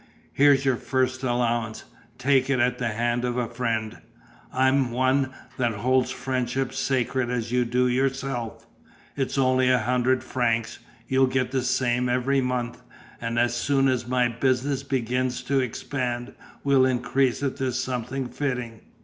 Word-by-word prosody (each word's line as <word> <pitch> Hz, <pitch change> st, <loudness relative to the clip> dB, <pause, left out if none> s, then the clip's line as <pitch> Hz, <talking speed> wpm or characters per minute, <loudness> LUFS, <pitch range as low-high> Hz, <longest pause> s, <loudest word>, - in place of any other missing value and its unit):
Here's 140 Hz, -1 st, +4 dB
your 130 Hz, -3 st, +2 dB
first 130 Hz, 0 st, -1 dB
allowance; 120 Hz, -3 st, -1 dB, 0.3 s
take 135 Hz, 0 st, +2 dB
it 135 Hz, -2 st, +2 dB
at 125 Hz, +1 st, +1 dB
the 125 Hz, -, 0 dB
hand 120 Hz, +2 st, -1 dB
of 125 Hz, 0 st, -1 dB
a 120 Hz, -2 st, 0 dB
friend; 115 Hz, -2 st, -2 dB, 0.5 s
I'm 130 Hz, 0 st, +2 dB
one 130 Hz, +2 st, +1 dB, 0.3 s
that 120 Hz, -3 st, +1 dB
holds 130 Hz, +4 st, +1 dB
friendship 130 Hz, 0 st, -2 dB
sacred 130 Hz, -1 st, 0 dB
as 120 Hz, -2 st, -2 dB
you 125 Hz, 0 st, +2 dB
do 125 Hz, +2 st, +2 dB
yourself. 130 Hz, -2 st, -2 dB, 0.5 s
It's 135 Hz, 0 st, -2 dB
only 130 Hz, -1 st, +3 dB
a 130 Hz, -, +5 dB
hundred 125 Hz, +2 st, +1 dB
francs; 115 Hz, -3 st, -1 dB, 0.3 s
you'll 130 Hz, 0 st, +3 dB
get 130 Hz, -1 st, 0 dB
the 130 Hz, -1 st, 0 dB
same 125 Hz, -1 st, +1 dB
every 130 Hz, +2 st, +1 dB
month, 125 Hz, -2 st, -2 dB, 0.4 s
and 115 Hz, 0 st, -2 dB
as 120 Hz, 0 st, +2 dB
soon 135 Hz, +2 st, +2 dB
as 125 Hz, -2 st, 0 dB
my 125 Hz, -1 st, +2 dB
business 130 Hz, +3 st, 0 dB
begins 125 Hz, -2 st, -1 dB
to 140 Hz, 0 st, +1 dB
expand 125 Hz, 0 st, -3 dB, 0.3 s
we'll 135 Hz, -2 st, +4 dB
increase 130 Hz, +1 st, +1 dB
it 135 Hz, -, -1 dB
to 130 Hz, -1 st, -1 dB
something 130 Hz, +1 st, -3 dB
fitting. 125 Hz, -4 st, -4 dB
125 Hz, 150 wpm, -25 LUFS, 120-130 Hz, 0.5 s, a